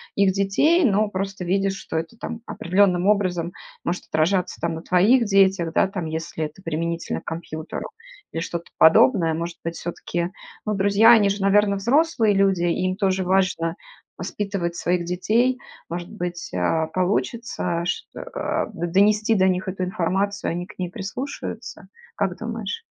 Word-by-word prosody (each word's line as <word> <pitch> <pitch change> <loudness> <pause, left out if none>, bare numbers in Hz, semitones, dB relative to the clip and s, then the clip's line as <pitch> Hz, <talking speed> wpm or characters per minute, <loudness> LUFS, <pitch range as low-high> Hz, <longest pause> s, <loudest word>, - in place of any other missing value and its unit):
их 200 -1 +3
детей, 205 - +3
но 210 +2 +2
просто 195 -1 -4
видишь, 195 +2 +1
что 195 - -7
это 165 +8 -4
там 235 -1 -6
определенным 185 0 +2
образом 185 -5 +1 0.3
может 175 +2 -3
отражаться 175 +4 0
там 165 0 -1
на 160 - -5
твоих 215 +9 +4
детях, 195 -4 +3
да, - - +3
там, 190 -4 -4
если 160 0 -3
это 155 +5 -10
применительно 165 +1 -3
к - - -34
компьютеру, 160 -1 -5 0.4
или 165 - -3
что-то 170 0 -4
подобное? 175 -1 +6
Может 170 +1 -4
быть, 165 0 -3
всё-таки, 175 +1 -4 0.3
ну, 215 - 0
друзья 200 +3 +5
они 210 -4 +6
же, 200 - -1
наверно, 200 +1 +4
взрослые 235 +1 +2
люди, 195 -3 +2
им 185 +2 0
тоже 190 -1 +1
важно 185 -3 +1 0.4
воспитывать 185 -1 -3
своих 175 0 0
детей? 230 +8 +1 0.3
Может 175 +1 -5
быть, 175 -1 -5
э, 155 - +1
получится 185 -1 -1
ш - - -2
э, - - -6
э, - - -2
донести 210 +6 +2
до 190 -1 +4
них 185 0 0
эту 185 0 -3
информацию, 195 +2 -1
они 175 +1 -3
к 200 0 -16
ней 180 - -2
прислушаются, 215 +10 -6 0.3
как 195 -3 -1
думаешь? 225 - -4
190 Hz, 155 wpm, -23 LUFS, 170-205 Hz, 0.4 s, подобное